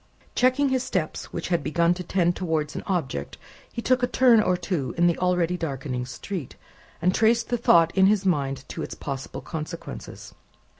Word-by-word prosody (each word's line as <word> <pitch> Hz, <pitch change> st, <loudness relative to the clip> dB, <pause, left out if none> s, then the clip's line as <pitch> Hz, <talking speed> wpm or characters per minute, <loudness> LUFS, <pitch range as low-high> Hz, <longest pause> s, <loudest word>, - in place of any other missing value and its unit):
Checking 255 Hz, +3 st, +3 dB
his 260 Hz, -1 st, +1 dB
steps 185 Hz, -11 st, -2 dB
which -, -, -5 dB
had 170 Hz, -3 st, +1 dB
begun 170 Hz, +4 st, +2 dB
to 180 Hz, -, -6 dB
tend 175 Hz, -1 st, +1 dB
towards 160 Hz, -4 st, -2 dB
an -, -, -3 dB
object, 140 Hz, -, -2 dB, 0.3 s
he 235 Hz, -, -5 dB
took 255 Hz, -1 st, +2 dB
a 245 Hz, -, +2 dB
turn 245 Hz, -2 st, +5 dB
or 185 Hz, -3 st, +1 dB
two 170 Hz, -7 st, -3 dB
in 170 Hz, -, +4 dB
the 170 Hz, -1 st, +4 dB
already 180 Hz, -1 st, +1 dB
darkening 135 Hz, -6 st, -3 dB
street, 165 Hz, +2 st, -6 dB, 0.5 s
and 180 Hz, +1 st, +3 dB
traced 230 Hz, +2 st, +2 dB
the 245 Hz, -, +1 dB
thought 165 Hz, -7 st, +4 dB
in 190 Hz, -1 st, +6 dB
his 205 Hz, -1 st, +2 dB
mind 140 Hz, -6 st, 0 dB
to -, -, -5 dB
its -, -, -5 dB
possible 135 Hz, -2 st, -6 dB
consequences. 155 Hz, -, -7 dB
175 Hz, 185 wpm, -25 LUFS, 155-205 Hz, 0.5 s, in